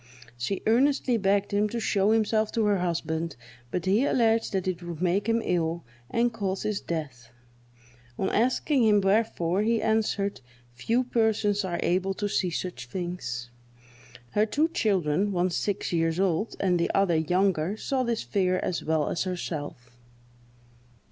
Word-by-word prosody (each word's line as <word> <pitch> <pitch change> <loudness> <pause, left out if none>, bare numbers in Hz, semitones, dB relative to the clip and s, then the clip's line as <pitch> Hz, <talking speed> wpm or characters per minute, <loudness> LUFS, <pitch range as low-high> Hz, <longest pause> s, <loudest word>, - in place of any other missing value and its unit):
She 125 +11 -3
earnestly 255 +2 +3
begged 200 0 +1
him 210 +1 +2
to 235 - -3
show 205 -2 +1
himself 220 0 +2
to 225 -2 +1
her 205 -2 +2
husband, 165 -2 -2 0.3
but 175 +6 -3
he 200 +6 +3
alleged 230 -4 +2
that 190 -2 -1
it 180 -1 -2
would 170 -2 -7
make 185 +4 +1
him 230 0 +2
ill, 170 -1 0 0.3
and 235 0 +1
cause 195 -4 -2
his 210 -2 -2
death. 135 -8 -5 0.9
On 190 - 0
asking 255 +3 +2
him 210 -2 +5
wherefore, 195 -3 +1
he 225 +1 +2
answered, 210 - 0 0.3
"Few 230 - 0
persons 220 -4 +1
are 175 -2 -3
able 190 +2 0
to 205 - -2
see 190 -2 0
such 160 -7 -5
things." 120 -8 -5 0.8
Her 210 +1 +2
two 305 +8 +1
children, 200 - +1
one 180 -1 +1
six 200 +1 -2
years 165 0 +1
old, 195 +3 0
and 180 -3 +2
the 170 - +1
other 195 -4 +3
younger, 180 +3 +1
saw 265 +3 -1
this 235 -2 -1
figure 185 +9 +1
as 180 - -2
well 155 -1 +1
as 175 - -1
herself. 150 -9 -5
195 Hz, 155 wpm, -27 LUFS, 170-220 Hz, 0.9 s, him